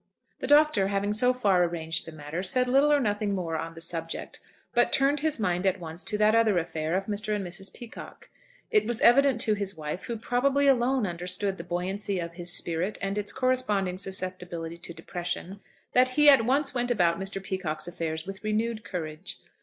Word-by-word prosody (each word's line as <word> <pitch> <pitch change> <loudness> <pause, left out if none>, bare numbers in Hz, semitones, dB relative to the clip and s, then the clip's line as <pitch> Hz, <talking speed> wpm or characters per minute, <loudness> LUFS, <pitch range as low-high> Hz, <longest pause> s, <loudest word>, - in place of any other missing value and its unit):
The - - -3
Doctor, 295 -9 +5
having 200 +1 0
so 250 +4 +4
far 200 -8 +2
arranged 165 -1 -2
the - - -7
matter, 155 +2 -5
said 250 +7 +2
little 275 +4 +4
or 295 - +5
nothing 205 -4 0
more 170 -3 -3
on 165 +1 -4
the 165 - -10
subject, 165 0 -5 0.3
but 240 0 +3
turned 275 +2 +3
his 310 -3 0
mind 180 -3 0
at 190 0 +1
once 165 +1 -5
to 210 - -1
that 210 +1 +4
other 225 -4 +3
affair 160 -1 -2
of 195 +1 -1
Mr. 210 +1 -1
and 200 -2 -3
Mrs. 190 +3 -4
Peacocke. 235 -2 -11 0.4
It 425 -2 +3
was 235 -2 -2
evident 265 -1 +5
to 215 - +3
his 200 -3 -3
wife, 155 +3 -5
who 235 - -4
probably 265 +5 +1
alone 260 -2 +3
understood 180 +2 -1
the - - -6
buoyancy 190 +3 -2
of 170 -1 -4
his 175 0 -5
spirit 175 +3 -1
and 195 0 -2
its 205 -1 -2
corresponding 230 -8 0
susceptibility 180 -3 -3
to 170 - -6
depression, 175 +3 -5 0.3
that 255 +1 +5
he 295 0 +8
at 255 -5 +5
once 275 +3 +1
went 245 -1 -1
about 175 -7 +2
Mr. 195 0 -3
Peacocke's 180 -5 -3
affairs 160 -2 -4
with 195 +1 -8
renewed 215 +1 -1
courage. 165 -3 -6
195 Hz, 195 wpm, -27 LUFS, 175-235 Hz, 0.4 s, he